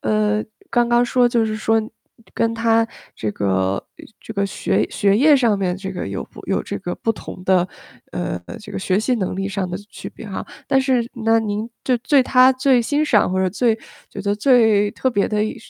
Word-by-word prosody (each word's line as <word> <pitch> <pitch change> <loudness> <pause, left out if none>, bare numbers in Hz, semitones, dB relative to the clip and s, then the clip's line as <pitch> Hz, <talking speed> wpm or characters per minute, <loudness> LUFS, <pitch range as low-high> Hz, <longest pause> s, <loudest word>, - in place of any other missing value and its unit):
呃， 215 0 +1 0.3
刚 240 -1 +2
刚 240 0 +4
说 245 0 +3
就 235 -2 +2
是 215 0 -2
说， 225 +1 +2 0.5
跟 230 0 0
他 230 0 +2 0.3
这 110 - -2
个 100 -1 -2 0.5
呃， - - -13 0.2
这 220 - -9
个 200 - +1
学 195 - 0
学 200 -2 +2
业 290 +6 +6
上 235 -7 +3
面 185 -2 0
这 190 +1 -6
个 185 - -5
有 95 -1 -4
不 - - -14
有 - - 0
这 - - -5
个 175 - -4
不 225 - -1
同 210 -4 -7
的， 185 -1 +3 0.5
呃， - - -3 0.2
这 210 - -11
个 - - -4
学 190 +1 +1
习 250 +3 +1
能 195 -7 -2
力 195 +1 -2
上 195 -1 -2
的 180 - -4
区 - - -9
别 - - -11
哈。 195 - -5 0.2
但 270 - +4
是 260 -2 +2 0.2
那 225 0 +4
您 215 +1 -3
就 255 - +2
对他 260 0 +4
最 255 -1 +3
欣 290 +6 0
赏 210 -10 +3
或 185 - 0
者 190 - +2
最 225 +4 +1 0.4
觉 200 - -7
得 200 +1 0
最 215 -3 +4
特 260 - -1
别 205 -5 +1
的 210 -1 0
一 215 - -3
220 Hz, 235 characters per minute, -20 LUFS, 200-240 Hz, 0.5 s, 业